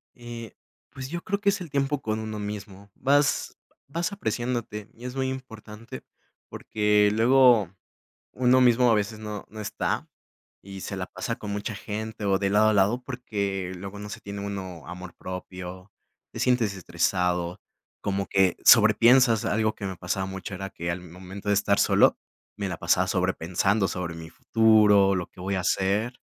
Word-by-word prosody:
Eh, 120 -2 -9 0.4
pues 130 -1 -7
yo 175 +1 -4
creo 200 +1 -2
que 200 - +1
es 200 - -3
el 170 -4 -7
tiempo 140 0 0
con 110 0 -2
uno 110 -1 -5
mismo. 100 -1 -7
Vas 145 +2 +2 0.4
vas 170 +7 -2
apreciándote, 120 - -3
y 120 +2 -9
es 125 +1 -7
muy 130 -1 0
importante, 115 -4 -9 0.5
porque 105 -1 +2
luego 120 -4 +5 0.6
uno 130 0 +4
mismo 125 0 +5
a - - +5
veces 105 +1 -2
no 105 -2 -6
no 110 0 -8
está 100 - -2 0.6
y 95 0 -9
se 100 - -5
la 95 - -3
pasa 95 +5 -4
con 105 - -6
mucha 105 +2 -3
gente 110 +1 -5
o 95 -1 +3
de 100 -1 0
lado 105 +2 +4
a - - +2
lado, 105 +5 +2
porque 100 -8 -3
luego 100 +2 -8
no 105 - -7
se - - -8
tiene 100 0 -6
uno 95 -6 -6
amor 90 0 -8
propio, 90 0 -8 0.4
te - - -8
sientes 120 -5 +2
estresado, 90 0 -1 0.4
como 100 0 -2
que 95 -3 +2
sobrepiensas 115 +1 +6
algo 110 0 +1
que 100 - -6
me 95 -2 -5
pasaba 90 +2 -2
mucho 95 +1 -6
era 95 +1 -5
que 85 -4 -4
al 85 +1 -4
momento 95 +3 -8
de - - +4
estar 100 0 +2
solo, - - +4 0.4
me 100 -2 -2
la 90 - -4
pasaba 90 +2 +2
sobrepensando 95 +2 +1
sobre 85 -1 -4
mi 80 0 -9
futuro, 105 0 +4
lo 90 -2 -2
que - - -19
voy 100 +2 -2
a - - 0
hacer. 100 +7 0
105 Hz, 175 wpm, -26 LUFS, 95-115 Hz, 0.6 s, sobrepiensas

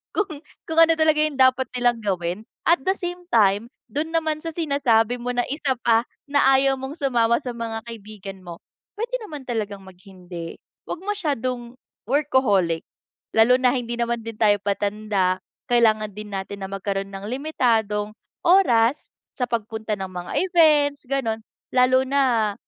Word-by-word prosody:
kung 415 -1 +1 0.4
kung 320 - -3
ano 330 0 +6
talaga 310 -1 +4
yung 290 -3 -4
dapat 260 0 +4
nilang 245 -1 +2
gawin. 180 -1 -1 0.3
At 340 -5 +4
the 380 - +3
same 355 0 -5
time, 205 -1 +4 0.3
dun 315 +3 -2
naman 315 -2 0
sa 330 - -3
sinasabi 250 -7 +2
mo 245 +1 -2
na 245 - +3
isa 280 -1 0
pa 230 +1 +4 0.2
na 285 0 +3
ayaw 270 0 +3
mong 265 +2 -5
sumama 235 -4 +2
sa 250 - -4
mga 225 -1 -4
kaibigan 200 -4 -9
mo 170 -1 -8 0.4
pwede 475 +2 -2
naman 300 -9 -8
talagang 210 -4 -3
mag-hindi, 180 -2 -10 0.3
wag - - -5
masyadong 255 - -2 0.4
workaholic 235 - +2 0.5
lalo 225 +3 +6
na 255 -1 +3
hindi 240 -2 -2
naman 235 0 0
din 230 -1 -6
tayo 210 -2 +4
patanda 200 -2 0 0.3
kailangan 215 -3 +3
din 210 0 -8
natin 195 +1 -5
na 190 - -3
magkaroon 195 0 -3
ng 195 +1 -7
limitadong 225 -7 0 0.3
oras 275 -9 +4 0.3
sa 250 - -1
pagpunta 220 -2 -3
ng 190 -1 -6
mga 180 -1 -6
events, 300 -6 +3
ganun. 245 -5 -1 0.4
Lalo 255 +1 +5
na 250 -6 +2
235 Hz, 155 wpm, -23 LUFS, 205-280 Hz, 0.5 s, ano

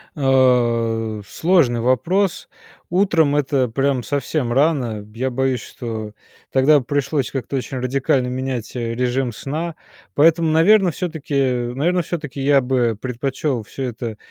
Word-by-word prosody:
А, 120 -5 +2
сложный 155 - +2
вопрос. 165 - 0 0.4
Утром- 170 -6 +2
это 135 -3 +1
прям 135 +1 0
совсем 140 -2 -2
рано. 125 -7 +1
Я 130 +2 -1
боюсь, 130 -1 -1
что 110 -3 -6 0.4
тогда 140 +3 +5
б 125 - -9
пришлось 140 0 -1
как-то 135 0 -4
очень 130 0 -3
радикально 130 0 0
менять, 125 -3 -4
э, 115 -2 -2
режим 125 +1 -1
сна, 155 +8 -4 0.4
поэтому, 160 +1 +4
наверно, 185 +3 +5
всё-таки 160 -3 -5 0.4
наверно, 175 +7 +1
всё-таки 150 -5 -5
я 140 0 +4
бы 125 -4 0
предпочел 130 0 -2
всё 135 +6 -7
это, 115 -3 -5
135 Hz, 130 wpm, -20 LUFS, 120-150 Hz, 0.4 s, тогда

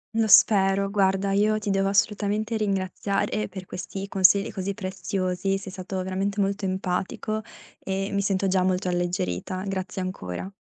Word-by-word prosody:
Lo 225 -1 +2
spero. 195 -1 +5
Guarda, 195 -1 +1
io 210 +2 +3
ti 210 -1 -4
devo 195 0 +2
assolutamente 210 +2 +1
ringraziare 200 +1 -1
per 190 -2 -8
questi 195 +2 -6
consigli 195 +1 +4
così 200 -1 -3
preziosi. 190 0 -2
Sei 195 -1 -8
stato 185 0 -4
veramente 195 +2 -1
molto 195 0 -1
empatico, 190 +4 -2 0.4
e 195 +1 -2
mi 200 - 0
sento 195 -1 +1
già 185 0 +2
molto 185 0 0
alleggerita. 175 - -2
Grazie 190 -1 -3
ancora. 185 - -5
195 Hz, 145 wpm, -25 LUFS, 185-200 Hz, 0.4 s, spero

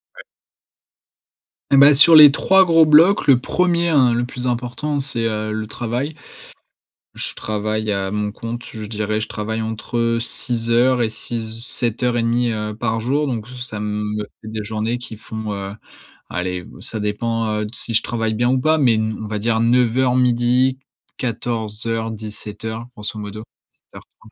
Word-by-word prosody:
Ouais. - - -11 1.5
Eh - - +7
ben, 140 +2 +8
sur 160 +3 +7
les 150 -2 +10
3 190 +3 +4
gros 165 -2 +5
blocs, 165 +6 +5
le 130 -3 +6
1er, 170 +3 +1
hein, 130 -6 +4
le 120 +1 0
plus 125 0 -7
important, 125 +4 -2
c'est, 125 -4 +2
heu, 110 -1 -2
le 110 0 -4
travail. 120 +7 -3 1.0
Je - - -6
travaille 110 0 -2
à 95 -1 -1
mon 105 0 -2
compte, 115 +2 -6
je 110 -2 -7
dirais 105 0 -2
je 110 - -4
travaille 110 +1 -4
entre 115 +1 -1
6 115 -1 -3
heures 125 +1 +3
et 110 - 0
six 115 +1 -5
h 110 +1 -6
sept 120 0 -1
heures 120 -1 +1
et - - +1
demie, 120 +1 +1
heu, 105 -1 -3
par 115 0 -2
jour 140 +5 0
donc 120 -2 -4
ça 125 -4 -7
me 105 0 -3 0.2
fait 110 - -11
des 110 -1 -5
journées 110 +3 -2
qui 115 -3 -9
font, 110 -1 -6
heu, 100 0 -5 0.6
allez, 90 0 -3 0.2
ça 110 -2 -4
dépend, 115 +2 -1
heu, - - -4
si 115 +1 -4
je - - +3
travaille 115 -2 -2
bien 120 +3 +1
ou 130 0 +2
pas 155 +2 +3
mais 120 -6 +3
on 110 0 -2
va 105 0 -3
dire 110 +1 0
09:00-12:00, 125 +1 +2 0.4
14:00-17:00, 110 -1 -4
grosso 105 0 -6
modo, 105 +1 -7 0.3
17:30 110 - -18
115 Hz, 170 wpm, -20 LUFS, 110-125 Hz, 1.5 s, les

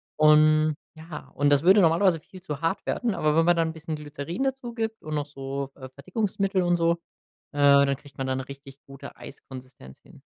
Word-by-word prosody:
Und, 155 0 +5 0.2
ja 160 0 -10
und 145 +1 +2
das 145 +1 +3
würde 195 +3 +6
normalerweise 170 +1 +3
viel 185 +2 -14
zu 150 -5 -6
hart 165 +4 -1
werden, 235 -4 -1
aber 150 0 +1
wenn 165 - +4
man 175 - +4
dann 165 -1 +1
'n - - -6
bisschen 160 0 -6
Glycerin 150 - -5
dazu 265 -3 -3
gibt 225 -1 -4
und 155 0 -4
noch 145 -1 -1
so, 140 -1 -6
äh, 130 -2 -10
Verdickungsmittel 195 - -2
und 175 -1 +2
so, 170 0 +2 0.6
äh, - - -9 0.3
dann 140 0 0
kriegt 140 -2 -18
man 135 - -3
da 130 - -1
'ne 130 0 -5
richtig 140 0 -12
gute 135 0 -11
Eiskonsistenz 130 - -12
hin. - - -19
155 Hz, 210 wpm, -25 LUFS, 140-175 Hz, 0.6 s, würde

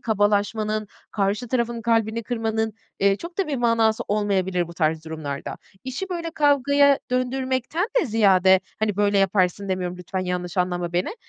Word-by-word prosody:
kabalaşmanın, 215 0 0 0.2
karşı 210 +4 -1
tarafın 235 -2 -1
kalbini 225 0 +1
kırmanın, 220 -1 -2 0.3
eee, 200 0 +4
çok 340 - -10
da 390 - +1
bir 280 - -1
manası 230 -2 +2
olmayabilir 190 -4 0
bu 170 - -10
tarz 160 -1 0
durumlarda. 155 -3 -5 0.3
İşi 260 +9 -4
böyle, 335 -2 -4
kavgaya 285 -1 +4
döndürmekten 260 - -1
de 320 - -1
ziyade, 190 -4 +4 0.2
hani, 210 -2 0
böyle, 205 -1 +2
yaparsın 195 0 +1
demiyorum, 180 -1 -2
lütfen 185 +1 -5
yanlış 180 0 -3
anlama 175 -1 -1
beni. 180 - -1
215 Hz, 150 wpm, -23 LUFS, 185-245 Hz, 0.3 s, eee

